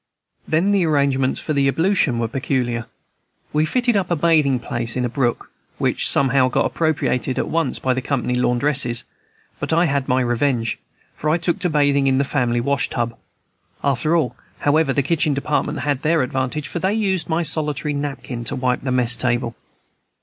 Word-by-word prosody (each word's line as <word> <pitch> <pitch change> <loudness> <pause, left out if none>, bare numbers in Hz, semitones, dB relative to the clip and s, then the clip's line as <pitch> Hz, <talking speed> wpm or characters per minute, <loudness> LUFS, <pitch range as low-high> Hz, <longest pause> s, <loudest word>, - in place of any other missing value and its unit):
Then 170 +6 +2
the 200 -3 +3
arrangements 140 -3 +1
for - - -4
ablution 145 0 +2
were 115 -1 0
peculiar. 125 -2 -2 0.7
We 155 +1 +2
fitted 245 +4 +1
up 195 -3 0
a 175 - +2
bathing 150 -4 +3
place 120 -1 -3
in 125 -1 0
a - - -1
brook, 120 -1 -2 0.3
which - - +2
somehow 130 -1 +3
got - - +1
appropriated 140 -5 -1
at - - -1
once 165 -4 0
by 130 - 0
the 130 - -2
company 125 -2 -1
laundresses; 125 0 +1 0.6
but - - -3
I 170 +2 +3
had 140 -3 -1
my 130 +1 +2
revenge, 120 -1 0 0.3
for 150 - -3
I 160 - +3
took 175 +2 -1
to 180 -2 0
bathing 140 -2 +2
in 130 -1 +3
the 140 - +3
family 125 -4 0
washtub. 120 -3 -1 0.7
After 140 +4 +1
all, 155 -7 0 0.3
however, 145 0 +2
the 140 +1 +1
kitchen 155 -1 +1
department 150 +2 -1
had 145 -2 -1
the 160 +2 +2
advantage, 130 +2 -2
for 175 - -4
they 190 +4 0
used 190 -6 0
my 165 +1 +1
solitary 150 -3 0
napkin 140 -4 -4
to 140 - -2
wipe 125 -1 0
the 130 - -3
mess 125 -1 +4
table. 120 0 -1
140 Hz, 180 wpm, -20 LUFS, 125-155 Hz, 0.7 s, mess